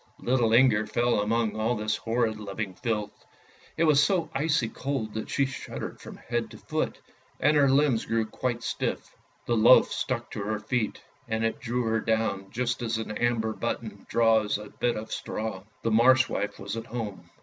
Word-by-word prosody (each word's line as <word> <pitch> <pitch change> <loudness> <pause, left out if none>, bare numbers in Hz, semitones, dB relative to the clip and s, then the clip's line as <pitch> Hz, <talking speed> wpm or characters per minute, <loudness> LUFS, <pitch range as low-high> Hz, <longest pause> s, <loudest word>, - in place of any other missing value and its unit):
Little 120 -3 +1
Inger 115 -3 +5
fell 120 +1 +1
among 110 +1 0
all 110 +3 0
this 110 -1 -1
horrid 115 -1 -1
living 100 -1 -4
filth; 105 +1 -3 0.5
it 165 - +2
was 150 -3 +5
so 170 -4 +1
icy 150 -3 +1
cold 125 -3 -3
that 110 - -4
she 140 - +2
shuddered 130 0 -6
from - - -10
head 120 -1 -3
to - - -11
foot, - - -3 0.4
and 150 +1 +3
her 140 -2 +5
limbs 135 -4 +3
grew 115 -1 +1
quite 120 +2 -3
stiff. - - -3 0.3
The 120 - +1
loaf 115 +3 +6
stuck 130 -3 -1
fast - - -30
to 105 - -4
her 110 +1 -1
feet, 110 +1 -2 0.3
and 110 0 0
it 115 - -1
drew 125 +1 -1
her 110 0 +1
down 110 -4 -1
just 120 +1 -2
as 115 -2 -1
an 110 -1 -4
amber 115 -2 0
button 110 -2 -4
draws 110 -3 +3
a 105 0 -9
bit 120 -1 0
of 110 +1 -6
straw. 105 -3 -4 0.2
The 115 - +1
Marsh 130 +4 +5
wife 105 0 -3
was 100 +2 -5
at 115 0 -6
home. 110 -5 -6
115 Hz, 190 wpm, -27 LUFS, 110-125 Hz, 0.5 s, loaf